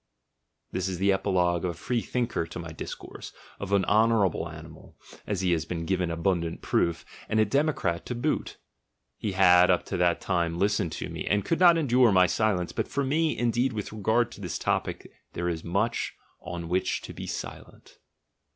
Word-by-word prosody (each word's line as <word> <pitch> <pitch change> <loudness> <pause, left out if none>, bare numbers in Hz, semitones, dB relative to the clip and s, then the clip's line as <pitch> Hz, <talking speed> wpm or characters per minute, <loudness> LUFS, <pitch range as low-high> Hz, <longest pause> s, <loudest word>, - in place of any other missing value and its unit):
This 95 0 -2
is 95 -2 -3
the 100 +2 +3
epilogue 90 -3 +1
of 90 - 0
a - - -3
freethinker 120 -5 -2
to - - -8
my 85 -2 -6
discourse, 80 - -8 0.3
of 100 -1 -5
an 100 -1 +3
honourable 105 -6 +2
animal 80 0 -12 0.3
(as 100 -3 -1
he 90 -2 +1
has 80 -2 0
given 90 +1 -1
abundant 85 0 -1
proof), 85 -1 0 0.2
and 110 - +1
a 110 - +5
democrat 110 - 0
to 125 - -3
boot; 120 - -2 0.6
he 105 -3 -3
had 90 -1 +6
up 90 - +2
to 95 - -3
that 90 -1 +2
time 85 -3 -1
listened 100 -2 +1
to - - -4
me, - - -6
and 105 0 +1
could 165 - 0
not 175 -2 +7
endure 125 -6 +4
my 95 -1 +6
silence, 95 -2 0
but - - -2
for 140 - -1
me, 155 +4 +1
indeed, 120 +1 +1
with 105 -1 -5
regard 110 +3 +1
to - - -11
this 90 - -3
topic - - -2 0.3
there 85 +1 -2
is 80 -2 -2
much 100 +7 -1 0.3
on 85 -1 -6
which 95 +2 0
to - - -8
be - - -7
silent. - - -8
95 Hz, 185 wpm, -27 LUFS, 85-115 Hz, 0.6 s, not